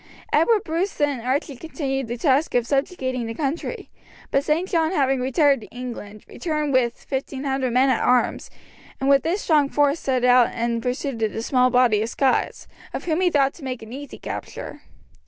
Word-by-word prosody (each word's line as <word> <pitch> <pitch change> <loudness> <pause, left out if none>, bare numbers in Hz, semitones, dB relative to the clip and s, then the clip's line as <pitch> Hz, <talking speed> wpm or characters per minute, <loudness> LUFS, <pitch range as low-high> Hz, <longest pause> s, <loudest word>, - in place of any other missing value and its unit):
Edward 450 -4 +3
Bruce 335 +5 -2
and 290 -4 +1
Archie 270 +4 -1
continued 270 -3 -3
the 240 +2 -4
task 275 +2 +1
of 245 -1 +2
subjugating 260 -3 -1
the 225 - -5
country; 295 +4 -4 0.4
but 275 - +2
St. 320 +5 0
John 330 -2 +1
having 270 -4 +2
retired 275 0 +3
to - - -11
England, 230 -4 -8
returned 305 -4 -2
with 240 -2 +1
fifteen 270 0 -4
hundred 265 -2 -1
men 260 +2 +4
at - - +1
arms, 250 0 +1 0.5
and 270 - -1
with 275 0 +5
this 365 +5 -1
strong 295 -4 +3
force 290 +2 +2
set 255 -2 -1
out 245 -1 +5
in 235 0 -1
pursuit 250 0 -3
of 220 -1 0
the 225 - -4
small 255 0 +3
body 245 -4 +3
of 225 - -2
Scots, 265 +2 0 0.3
of - - -4
whom 335 +1 0
he 365 - +4
thought 275 -4 +2
to 320 - -14
make 255 -3 -5
an 220 +2 -10
easy 285 +2 -8
capture. - - -7
270 Hz, 190 wpm, -23 LUFS, 250-295 Hz, 0.5 s, with